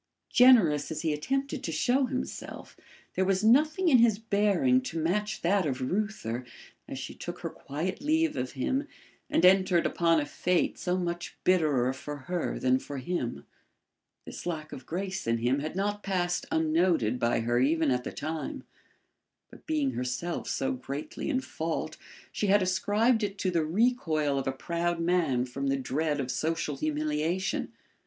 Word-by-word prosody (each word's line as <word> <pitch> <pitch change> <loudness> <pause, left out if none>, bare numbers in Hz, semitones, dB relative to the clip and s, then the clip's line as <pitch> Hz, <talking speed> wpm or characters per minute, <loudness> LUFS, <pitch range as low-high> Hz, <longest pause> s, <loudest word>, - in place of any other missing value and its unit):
Generous 220 - +6
as 160 0 -4
he 160 -2 +1
attempted 270 - -2
to 165 - -2
show 250 - +2
himself, 255 -1 -6 0.4
there 190 - +1
was 190 +1 +1
nothing 305 +10 +4
in 265 -7 +6
his 230 -3 +4
bearing 220 +4 +2
to 250 -9 -5
match 210 +7 -1
that 190 +3 +3
of 130 -3 -2
Reuther 130 - -2 0.4
as - - -6
she - - -6
took - - -7
her - - -4
quiet 165 - -4
leave 315 +2 +1
of 125 0 -3
him 265 - -1 0.4
and 180 - +3
entered 185 -2 +5
upon 165 -1 +3
a 145 - -1
fate 180 +4 0
so 180 0 0
much 175 -1 -4
bitterer 150 -9 +3
for 145 +2 -7
her 175 +6 -3
than 130 0 +2
for 140 - -7
him. 130 -2 -3 0.8
This - - -8
lack 155 -3 -4
of 130 - -9
grace 190 0 -3
in 115 0 +2
him 125 +4 +1
had 155 +4 -4
not 205 +2 -1
passed 180 -3 -1
unnoted 160 -7 +2
by 115 -1 +1
her 120 +1 +1
even 155 +2 +2
at 125 0 0
the - - -5
time, 155 +1 -5 0.9
but - - -16
being 300 -4 +1
herself 130 - -3
so 135 - -1
greatly 140 - -5
in 265 -3 +1
fault 160 -9 -4 0.3
she 210 - -1
had 200 0 +4
ascribed 210 +6 +2
it 200 -1 -2
to 190 -2 0
the 165 -2 +1
recoil 160 - +1
of 135 - -4
a - - +2
proud 170 +5 -2
man 165 -8 +1
from 135 +2 -4
the 135 0 +1
dread 145 +3 -1
of 130 -2 -2
social 160 -2 -1
humiliation. 155 +5 -1
170 Hz, 170 wpm, -29 LUFS, 145-205 Hz, 0.9 s, Generous